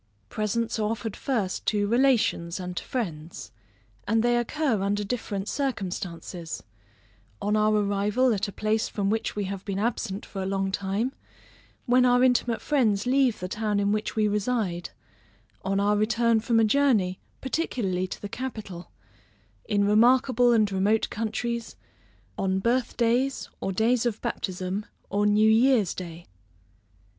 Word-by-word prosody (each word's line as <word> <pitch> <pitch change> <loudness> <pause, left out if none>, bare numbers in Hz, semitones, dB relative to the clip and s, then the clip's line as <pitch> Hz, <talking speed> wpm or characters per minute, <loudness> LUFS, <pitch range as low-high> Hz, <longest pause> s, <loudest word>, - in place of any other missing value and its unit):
Presents 225 +2 -1
are 210 -1 +1
offered 225 -2 -3
first 215 -9 -2
to 205 -1 +2
relations 230 -8 +2
and 180 -1 -5
to - - -3
friends; 165 - -5 0.6
and 225 +1 +2
they 240 0 +3
occur 240 -1 0
under 205 +1 0
different 205 -2 -3
circumstances; 180 - -4 0.8
on 210 +1 0
our 215 0 +3
arrival 210 +4 +2
at 205 -1 -1
a - - -6
place 215 +2 0
from 200 -1 -1
which 220 0 -1
we 205 - -1
have 195 0 -5
been 195 -2 -3
absent 210 -2 -2
for 195 - -6
a 190 - -2
long 195 0 -1
time; 200 +6 -1 0.7
when 250 0 +4
our 245 0 +4
intimate 245 -2 +2
friends 225 -8 +2
leave 260 -2 +2
the 180 - -4
town 210 +1 -1
in 200 0 +1
which 215 0 -2
we 215 -1 +2
reside; 205 -4 -1 0.7
on 195 +1 0
our 205 +1 +2
return 230 +2 +2
from 230 +1 +2
a - - +5
journey, 215 -7 +2 0.2
particularly 215 - -1
to - - -7
the 205 - -6
capital; 210 -7 -6 0.8
in 205 -1 +1
remarkable 245 +3 +4
and 215 -3 +3
remote 200 +3 +1
countries; 230 +2 -3 0.6
on 190 -1 +1
birth 235 +5 0
days, 245 +3 +1
or 195 - -2
days 230 +5 +2
of 225 -2 -3
baptism, 190 -3 -3 0.3
or 205 +1 +2
new 210 +1 +4
year's 225 -4 +4
day. 170 -2 -8
215 Hz, 150 wpm, -26 LUFS, 195-240 Hz, 0.8 s, a